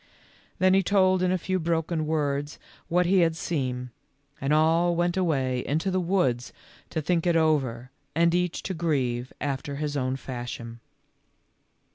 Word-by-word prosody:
Then 185 0 +4
he 195 - +5
told 185 -1 +3
in 185 0 +2
a 185 - +2
few 185 +2 -1
broken 165 -1 -1
words 145 -2 -1 0.3
what 180 +1 +2
he 190 +2 +4
had 165 -2 +3
seen, 130 -7 -3 0.5
and 135 +1 0
all 165 +3 +3
went 175 +1 +1
away 135 -9 0
into 160 +7 -1
the 185 - +1
woods 165 - 0 0.4
to 160 - -3
think 175 +2 +1
it 170 - +3
over 135 -7 +1 0.2
and 170 +1 +3
each 180 -1 0
to 190 - -3
grieve 130 -7 -1
after 140 0 -3
his 145 0 -3
own 130 -1 0
fashion. 120 -3 -6
160 Hz, 155 wpm, -26 LUFS, 135-175 Hz, 0.5 s, he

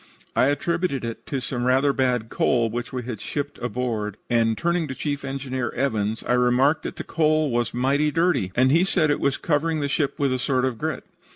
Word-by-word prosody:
"I - - +4
attributed 155 -2 0
it 115 -1 -6
to 135 - -2
some 125 -1 -3
rather 135 +2 +3
bad 125 -4 0
coal 115 -3 +1
which 120 +1 -4
we 125 -2 -4
had 115 -3 -6
shipped 145 0 -4
aboard, 115 -4 -3
and, 115 -1 +2
turning 170 -1 0
to 130 - -5
Chief 145 -1 -3
Engineer 130 -3 -3
Evans, 110 -4 -1
I 120 - 0
remarked 125 +5 +3
that - - -6
'that - - -6
coal 155 -2 +2
was 120 0 0
mighty 140 +5 +1
dirty,' 150 - +1
and 130 +2 +4
he 165 +4 +5
said 170 -5 +2
that - - +4
it - - -3
was 140 -1 +1
covering 160 0 0
the 145 - 0
ship 140 0 -1
with 140 -2 +1
a 130 - -1
sort 130 0 +1
of 125 -4 -2
grit. - - -3
130 Hz, 215 wpm, -24 LUFS, 120-145 Hz, -, he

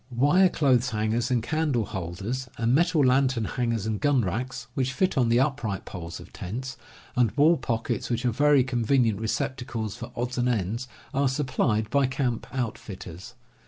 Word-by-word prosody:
Wire 145 +10 +4
clothes 130 -6 +2
hangers 110 +1 0
and 120 -3 +1
candle 150 -4 0
^ - - -14
* - - -15
holders, 100 +7 -4
and 115 +1 +1
metal 165 -1 +3
lantern 130 -3 +2
hangers 115 -3 -1
and 110 -2 -2
gun 145 -4 +3
racks, 120 +6 -3
which 130 0 -1
fit 185 +9 +1
on 125 -3 +2
the 120 +1 +4
upright 130 -8 -1
poles 85 -3 -7
of - - -13
tents, 130 +8 -5 0.4
and 125 -3 +4
wall 155 +4 +6
pockets, 115 -5 -2
which 120 0 -1
are 120 - +3
very 145 +2 +4
convenient 120 -3 +1
receptacles 120 -3 -3
for 120 0 -8
odds 125 +1 -2
and 125 +1 +2
ends, 115 +2 -1 0.3
are 140 0 +2
supplied 130 -5 0
by 140 -1 +3
camp 130 -3 -2
outfitters. 110 -4 -6
125 Hz, 175 wpm, -26 LUFS, 110-135 Hz, 0.4 s, wall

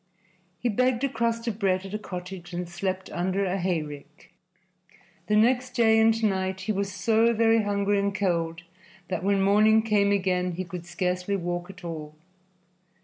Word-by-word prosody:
He 245 - -2
begged 250 +3 +1
a 275 - +2
crust 230 -1 -1
of 220 -2 -3
bread 190 -2 +1
at 195 - -8
a 210 - -2
cottage 180 -2 -8
and 175 0 -3
slept 185 +2 -4
under 190 +3 -1
a 190 +1 -1
hayrick. 150 -4 -4 0.9
The 210 - +2
next 250 +3 +2
day 225 -2 +4
and 225 0 +3
night 190 -2 0
he 215 - -2
was 200 -1 -2
so 225 +5 +2
very 225 0 +4
hungry 205 0 +1
and 200 0 -1
cold 165 -4 -1 0.5
that 185 -2 -2
when 195 0 +2
morning 215 +2 +5
came 205 -2 +2
again 180 -2 0
he 185 +2 -3
could 175 -1 -8
scarcely 180 +2 -1
walk 175 -1 -3
at 190 -1 -12
all. 155 -3 -6
195 Hz, 170 wpm, -26 LUFS, 180-220 Hz, 0.9 s, morning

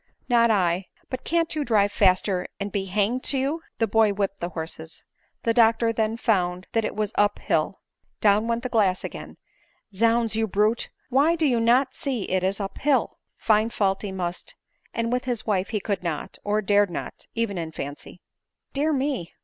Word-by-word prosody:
" - - -43
Not 235 -1 +4
I. 185 -3 +1 0.2
But 255 -1 -4
can't 335 0 0
you 305 - 0
drive 210 -5 +3
faster 185 -1 +2
and 200 0 -3
be 195 -1 -1
hanged 210 +6 0
to 275 - 0
you 280 +5 -1
?" - - -57
The 225 - +2
boy 220 -1 +3
whipped 195 -1 -2
his 175 +1 -3
horses. 160 0 -5 0.4
The 230 - +2
doctor 230 0 +4
then 220 0 0
found 180 -6 0
that 225 - +2
it 215 - -3
was 210 -1 -1
up 205 0 +2
hill - - -1 0.2
— - - -45
down 210 +3 +3
went 235 +1 -1
the 255 - -2
glass 200 -6 +2
again; - - -7 0.3
" 215 - -40
zounds, 230 +2 +2
you 220 0 +1
brute, 210 +3 +1 0.2
why, 285 +6 +4
do 325 -2 +1
you 245 -5 +3
not 245 +4 +3
see 260 -7 -2
it 185 -1 0
is 195 +2 0
up 195 -1 -5
hill 275 -4 +1
?" - - -53
For - - -25
find 215 +1 +3
fault 195 -3 0
he 205 - -4
must; 185 - -4 0.4
and 230 +1 -1
with 250 0 -1
his 240 -3 -2
wife 195 -3 +1
he 215 - -1
could 200 -1 -2
not, 170 -4 -4
or 210 +1 0
dared 205 0 +3
not, 175 - -7
even 225 -5 -1
in 160 -1 -4
fancy. 145 +4 -8 0.3
" - - -54
Dear 295 +3 +1
me 265 - -2
215 Hz, 215 wpm, -25 LUFS, 195-235 Hz, 0.4 s, Not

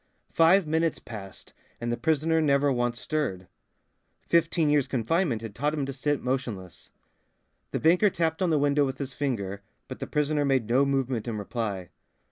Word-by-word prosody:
Five 170 +3 +5
minutes 160 +1 0
passed 100 -4 -10 0.3
and 120 0 -2
the - - +1
prisoner 160 +3 +1
never 140 -1 +3
once 120 -1 -1
stirred. 95 -13 -2 0.8
Fifteen 165 -1 +2
years' 145 -2 +3
confinement 130 - 0
had 110 -2 -6
taught 145 +7 -1
him 145 -3 -1
to 135 - -5
sit 145 +2 -1
motionless. 120 - -4 0.8
The - - -2
banker 180 +6 +4
tapped 165 -1 -1
on 185 - +2
the 155 - +3
window 145 0 +3
with 135 -1 -2
his 135 -2 -5
finger, 100 -9 -3 0.3
but - - -8
the - - -5
prisoner 150 0 0
made 135 -5 +1
no 130 +4 +3
movement 130 -4 -1
in 115 -2 -3
reply. 100 -4 -4
140 Hz, 170 wpm, -27 LUFS, 120-155 Hz, 0.8 s, Five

